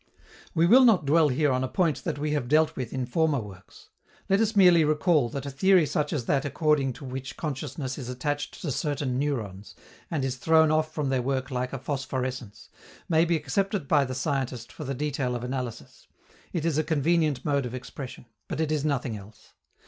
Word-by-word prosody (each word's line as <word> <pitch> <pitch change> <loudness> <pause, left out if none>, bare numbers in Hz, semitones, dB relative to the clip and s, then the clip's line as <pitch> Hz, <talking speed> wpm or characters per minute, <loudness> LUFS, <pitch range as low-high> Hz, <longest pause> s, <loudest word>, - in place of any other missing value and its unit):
We 165 0 +4
will 250 +9 +7
not 215 - +5
dwell 155 +1 +4
here 145 +2 +2
on 130 0 0
a - - 0
point 165 0 0
that - - -2
we 150 +1 -2
have 145 -5 -1
dealt 155 +3 +3
with 125 -3 -4
in 130 -1 -2
former 155 +3 +1
works. 95 -4 -12 0.4
Let 195 +1 +4
us 220 0 +1
merely 180 -4 +6
recall 150 -3 +2
that 140 +3 -5
a 140 - -4
theory 185 +5 +4
such 150 0 -1
as 145 -8 -2
that 135 +1 +1
according 145 -2 +1
to 140 +3 -11
which 130 +1 -6
consciousness 135 -2 -4
is 125 -2 -6
attached 145 +3 -3
to 155 - -2
certain 140 -2 -1
neurons, 110 -9 -3 0.3
and 145 -5 -1
is 130 -1 -2
thrown 160 +4 +4
off 155 0 +1
from 150 -3 -2
their 130 -1 +1
work 130 +1 -2
like 125 0 -2
a 135 - -3
phosphorescence, 130 -4 -4 0.4
may 165 0 +3
be 170 0 +1
accepted 165 +3 -1
by 145 -1 +4
the 130 -1 -4
scientist 130 -3 -2
for 155 - -8
the 135 0 -3
detail 135 -3 -2
of 120 - -4
analysis; 125 -2 -6 0.4
it 165 -3 -2
is 160 -2 +1
a - - +2
convenient 155 -3 +1
mode 140 -3 +1
of 125 - -6
expression. 130 0 -8 0.2
But - - -4
it 160 -1 0
is 150 -2 0
nothing 135 -6 -1
else. 105 +1 -13
140 Hz, 205 wpm, -27 LUFS, 130-155 Hz, 0.4 s, will